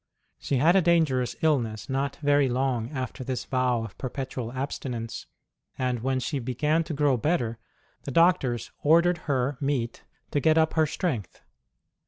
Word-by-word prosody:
She 140 Hz, -, -1 dB
had 160 Hz, +8 st, +4 dB
a 195 Hz, -, +6 dB
dangerous 160 Hz, -8 st, +2 dB
illness 120 Hz, -9 st, +1 dB
not 135 Hz, +1 st, -1 dB
very 145 Hz, -2 st, +4 dB
long 125 Hz, -2 st, 0 dB
after 130 Hz, -2 st, -5 dB
this 130 Hz, 0 st, -3 dB
vow 125 Hz, -3 st, +1 dB
of 110 Hz, -4 st, -8 dB
perpetual 130 Hz, -2 st, -4 dB
abstinence; 125 Hz, -3 st, -5 dB, 0.5 s
and 125 Hz, -2 st, -1 dB
when 130 Hz, +2 st, 0 dB
she 140 Hz, +2 st, -2 dB
began 150 Hz, +6 st, 0 dB
to 155 Hz, -, -4 dB
grow 140 Hz, -3 st, +2 dB
better 120 Hz, -5 st, 0 dB, 0.5 s
the -, -, -4 dB
doctors 150 Hz, -7 st, +2 dB
ordered 170 Hz, +3 st, +4 dB
her 135 Hz, 0 st, 0 dB
meat 135 Hz, -5 st, -2 dB, 0.3 s
to 145 Hz, -, +1 dB
get 160 Hz, +2 st, +3 dB
up 160 Hz, 0 st, +3 dB
her 160 Hz, -1 st, +3 dB
strength. 140 Hz, -, -3 dB
135 Hz, 155 wpm, -26 LUFS, 125-155 Hz, 0.5 s, a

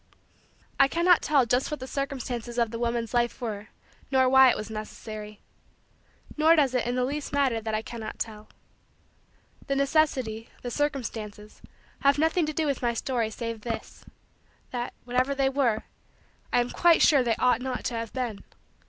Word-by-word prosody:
I 275 Hz, -, +7 dB
cannot 340 Hz, +3 st, +4 dB
tell 280 Hz, -4 st, +3 dB
just 250 Hz, +2 st, +1 dB
what 300 Hz, -, -4 dB
the 260 Hz, -, -6 dB
circumstances 255 Hz, -4 st, -4 dB
of 235 Hz, -2 st, +1 dB
the 230 Hz, -, -5 dB
woman's 235 Hz, -1 st, -1 dB
life 240 Hz, -1 st, +1 dB
were 215 Hz, -4 st, -5 dB, 0.4 s
nor 260 Hz, -1 st, +4 dB
why 265 Hz, 0 st, +7 dB
it -, -, +1 dB
was 215 Hz, +1 st, -6 dB
necessary. 215 Hz, -1 st, -7 dB, 1.0 s
Nor 315 Hz, +2 st, +5 dB
does 280 Hz, -5 st, +3 dB
it 250 Hz, -2 st, 0 dB
in 245 Hz, -, -1 dB
the 250 Hz, 0 st, +1 dB
least 290 Hz, +2 st, -4 dB
matter 265 Hz, -5 st, +2 dB
that 220 Hz, 0 st, -2 dB
I 215 Hz, -, -2 dB
cannot 225 Hz, -1 st, -7 dB
tell. 215 Hz, -1 st, -5 dB, 1.2 s
The 275 Hz, -, 0 dB
necessity, 275 Hz, -6 st, +1 dB
the 245 Hz, -, -4 dB
circumstances, 225 Hz, -7 st, -4 dB, 0.4 s
have 280 Hz, +1 st, +3 dB
nothing 320 Hz, +2 st, +2 dB
to 310 Hz, -, -2 dB
do 315 Hz, +1 st, 0 dB
with 280 Hz, -3 st, -1 dB
my 240 Hz, -1 st, 0 dB
story 235 Hz, -2 st, -1 dB
save 230 Hz, 0 st, -5 dB
this: 230 Hz, 0 st, -6 dB, 0.7 s
that, 245 Hz, -1 st, -4 dB
whatever 255 Hz, +3 st, 0 dB
they 270 Hz, -1 st, +2 dB
were, 255 Hz, -6 st, +1 dB, 0.7 s
I 245 Hz, -, +4 dB
am 240 Hz, -, -3 dB
quite 345 Hz, -1 st, +4 dB
sure 285 Hz, -4 st, +6 dB
they 235 Hz, -2 st, +1 dB
ought 250 Hz, -1 st, +2 dB
not 255 Hz, -1 st, -3 dB
to 250 Hz, -, -2 dB
have 230 Hz, -1 st, -4 dB
been. 240 Hz, -6 st, -4 dB
245 Hz, 175 wpm, -27 LUFS, 230-275 Hz, 1.2 s, I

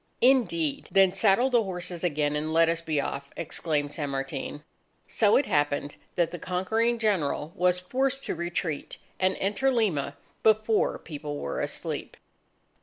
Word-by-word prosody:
"Indeed! 275 Hz, +4 st, +2 dB
Then 195 Hz, -2 st, +5 dB
saddle 200 Hz, +6 st, +3 dB
the 240 Hz, -2 st, +5 dB
horses 180 Hz, -3 st, -4 dB
again, 150 Hz, -3 st, +1 dB
and 155 Hz, +1 st, -2 dB
let 165 Hz, +1 st, +4 dB
us 165 Hz, 0 st, 0 dB
be 155 Hz, -3 st, -1 dB
off!" 140 Hz, 0 st, -3 dB
exclaimed 150 Hz, -3 st, -2 dB
San 145 Hz, -1 st, -3 dB
Martin. 135 Hz, +2 st, -4 dB, 0.4 s
So 210 Hz, -2 st, +4 dB
it 285 Hz, -, +2 dB
happened 145 Hz, -1 st, 0 dB, 0.2 s
that 170 Hz, -3 st, +1 dB
the 175 Hz, -, -6 dB
conquering 220 Hz, +7 st, 0 dB
General 170 Hz, -8 st, 0 dB
was 180 Hz, 0 st, +3 dB
forced 265 Hz, +8 st, -1 dB
to -, -, -2 dB
retreat, 170 Hz, -3 st, -3 dB, 0.2 s
and 190 Hz, 0 st, +2 dB
enter 205 Hz, +7 st, +1 dB
Lima 175 Hz, -, 0 dB, 0.2 s
before 215 Hz, 0 st, +3 dB
people 145 Hz, -2 st, -6 dB
were 70 Hz, -, -3 dB
asleep. -, -, -4 dB
180 Hz, 150 wpm, -27 LUFS, 150-220 Hz, 0.4 s, Then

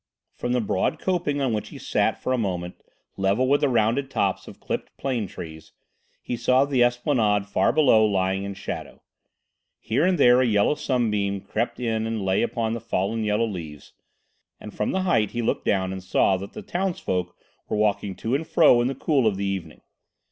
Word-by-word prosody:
From 120 Hz, -, -3 dB
the 125 Hz, -, +2 dB
broad 100 Hz, -3 st, 0 dB
coping 175 Hz, -6 st, -1 dB
on 130 Hz, -4 st, +1 dB
which 105 Hz, -, -3 dB
he -, -, -10 dB
sat -, -, 0 dB
for 130 Hz, -, -1 dB
a -, -, +1 dB
moment, 90 Hz, -4 st, -3 dB, 0.4 s
level 100 Hz, +6 st, +1 dB
with 140 Hz, +2 st, +3 dB
the 145 Hz, -, +3 dB
rounded 120 Hz, +3 st, +1 dB
tops -, -, -1 dB
of -, -, -12 dB
clipped -, -, -5 dB
plane 125 Hz, -6 st, -2 dB
trees, 80 Hz, -3 st, -10 dB, 0.5 s
he 125 Hz, -, -3 dB
saw 130 Hz, +3 st, +3 dB
the 135 Hz, -3 st, +2 dB
esplanade 120 Hz, -5 st, +1 dB
far 105 Hz, -, +2 dB
below 130 Hz, -8 st, +5 dB
lying 95 Hz, -2 st, +1 dB
in 100 Hz, 0 st, -5 dB
shadow. 95 Hz, -, -7 dB, 0.8 s
Here 130 Hz, +7 st, 0 dB
and 180 Hz, 0 st, +3 dB
there 125 Hz, -3 st, +6 dB
a -, -, +3 dB
yellow 105 Hz, +3 st, +3 dB
sunbeam 105 Hz, -8 st, -1 dB
crept 115 Hz, +5 st, -3 dB
in 110 Hz, -2 st, -1 dB
and 110 Hz, -3 st, -3 dB
lay 95 Hz, 0 st, +2 dB
upon 115 Hz, -1 st, -1 dB
the 115 Hz, -, -4 dB
fallen 110 Hz, 0 st, -1 dB
yellow 105 Hz, +2 st, +1 dB
leaves, 80 Hz, -9 st, -8 dB, 0.7 s
and 105 Hz, -, -10 dB
from 105 Hz, -, -2 dB
the 190 Hz, -, 0 dB
height 115 Hz, -, +2 dB
he 120 Hz, 0 st, -2 dB
looked -, -, -1 dB
down 95 Hz, -1 st, +1 dB
and 95 Hz, -1 st, -7 dB
saw 95 Hz, +1 st, +2 dB
that 100 Hz, +2 st, -8 dB
the -, -, -8 dB
townsfolk 170 Hz, -, -2 dB, 0.3 s
were -, -, -1 dB
walking 105 Hz, -2 st, 0 dB
to 110 Hz, +6 st, -3 dB
and 155 Hz, +4 st, -1 dB
fro 135 Hz, -7 st, +5 dB
in 120 Hz, -, +1 dB
the 135 Hz, -, -2 dB
cool 135 Hz, -3 st, +1 dB
of 100 Hz, -3 st, 0 dB
the 100 Hz, -, -2 dB
evening. 95 Hz, -5 st, -4 dB
110 Hz, 200 wpm, -24 LUFS, 100-130 Hz, 0.8 s, there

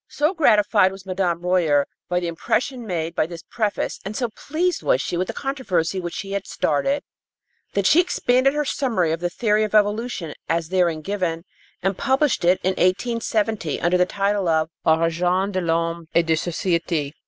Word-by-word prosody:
So 300 Hz, +5 st, +1 dB
gratified 210 Hz, -, +4 dB
was 195 Hz, 0 st, -11 dB
Madame 185 Hz, -3 st, -1 dB
Royer 170 Hz, -6 st, +2 dB, 0.2 s
by 180 Hz, 0 st, +1 dB
the 175 Hz, -, -3 dB
impression 235 Hz, -, -2 dB
made 165 Hz, -3 st, -2 dB
by 155 Hz, -, 0 dB
this 170 Hz, -1 st, -9 dB
preface 215 Hz, -3 st, -1 dB
and 200 Hz, +2 st, -5 dB
so 245 Hz, -2 st, -1 dB
pleased 330 Hz, +10 st, -2 dB
was -, -, +2 dB
she -, -, -3 dB
with 180 Hz, +1 st, -1 dB
the -, -, -2 dB
controversy 195 Hz, -, -1 dB
which 175 Hz, -2 st, -5 dB
she 195 Hz, -, -5 dB
had 200 Hz, 0 st, -3 dB
started, 275 Hz, -, 0 dB, 0.7 s
that 200 Hz, -1 st, +1 dB
she 310 Hz, -, +6 dB
expanded 270 Hz, -6 st, +2 dB
her 295 Hz, 0 st, 0 dB
summary 225 Hz, -, 0 dB
of 165 Hz, -, -1 dB
the 175 Hz, 0 st, -1 dB
theory 215 Hz, +2 st, +1 dB
of 215 Hz, 0 st, -2 dB
evolution 210 Hz, -5 st, +1 dB, 0.2 s
as 165 Hz, -1 st, 0 dB
therein 175 Hz, -4 st, +1 dB
given 180 Hz, -4 st, -2 dB, 0.4 s
and 195 Hz, 0 st, 0 dB
published 270 Hz, -2 st, +1 dB
it 180 Hz, +2 st, +4 dB
in 185 Hz, -, +2 dB
1870 215 Hz, -, 0 dB
under 175 Hz, +2 st, +2 dB
the 180 Hz, -, +3 dB
title 200 Hz, -1 st, 0 dB
of 160 Hz, 0 st, +2 dB, 0.2 s
Origine 175 Hz, +4 st, +2 dB
de 185 Hz, -1 st, -1 dB
l'Homme 165 Hz, 0 st, -1 dB
et 170 Hz, -, +4 dB
de 165 Hz, -, +2 dB
Sociétés. 165 Hz, -3 st, -1 dB
185 Hz, 180 wpm, -22 LUFS, 170-220 Hz, 0.7 s, she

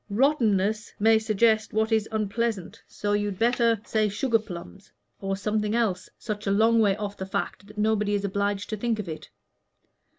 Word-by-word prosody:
'Rottenness' 215 Hz, -4 st, +2 dB
may 220 Hz, +1 st, +5 dB
suggest 220 Hz, 0 st, +2 dB
what 220 Hz, +1 st, +1 dB
is 220 Hz, -1 st, +1 dB
unpleasant, 215 Hz, -2 st, -2 dB
so 205 Hz, 0 st, -2 dB
you'd 205 Hz, -2 st, -1 dB
better 230 Hz, 0 st, +2 dB
say 215 Hz, -1 st, +1 dB
'sugar 225 Hz, +3 st, +1 dB
plums,' 170 Hz, -, -10 dB, 0.3 s
or 195 Hz, 0 st, -2 dB
something 210 Hz, +1 st, -1 dB
else 205 Hz, -6 st, 0 dB
such 210 Hz, -2 st, -5 dB
a -, -, +2 dB
long 225 Hz, +3 st, +4 dB
way 205 Hz, -3 st, +4 dB
off 205 Hz, -1 st, -5 dB
the -, -, -4 dB
fact 200 Hz, +1 st, -3 dB
that 210 Hz, +1 st, -15 dB
nobody 210 Hz, -1 st, +1 dB
is 200 Hz, 0 st, -1 dB
obliged 200 Hz, +1 st, -1 dB
to 215 Hz, -, -2 dB
think 230 Hz, +1 st, 0 dB
of 210 Hz, -4 st, -5 dB
it. 160 Hz, -1 st, -7 dB
210 Hz, 175 wpm, -26 LUFS, 200-220 Hz, 0.3 s, may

